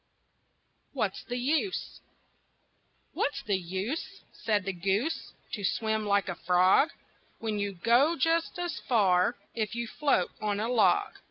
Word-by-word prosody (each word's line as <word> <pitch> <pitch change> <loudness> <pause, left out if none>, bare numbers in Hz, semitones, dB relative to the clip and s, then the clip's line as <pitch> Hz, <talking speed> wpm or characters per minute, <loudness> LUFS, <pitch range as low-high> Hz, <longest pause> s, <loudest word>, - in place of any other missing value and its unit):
WHAT'S - - -2
THE 245 - -3
USE? 310 +10 -1 1.1
"What's 285 - -1
the 205 - +1
use," 190 - -4
Said 210 -3 0
the 195 - -2
goose, 195 - -1 0.2
"To 205 - -4
swim 220 +1 0
like 200 -1 +2
a 185 - -2
frog, 180 - +4 0.5
When 215 -2 -2
you 200 -1 -2
go 240 - +3
just 330 +3 +1
as 350 -1 -3
far 200 -2 +3 0.2
If 215 -1 -2
you 235 0 -2
float 275 -9 +1
on 205 -1 -1
a 220 +2 -1
log?" 330 - +3
220 Hz, 140 wpm, -29 LUFS, 195-270 Hz, 1.1 s, frog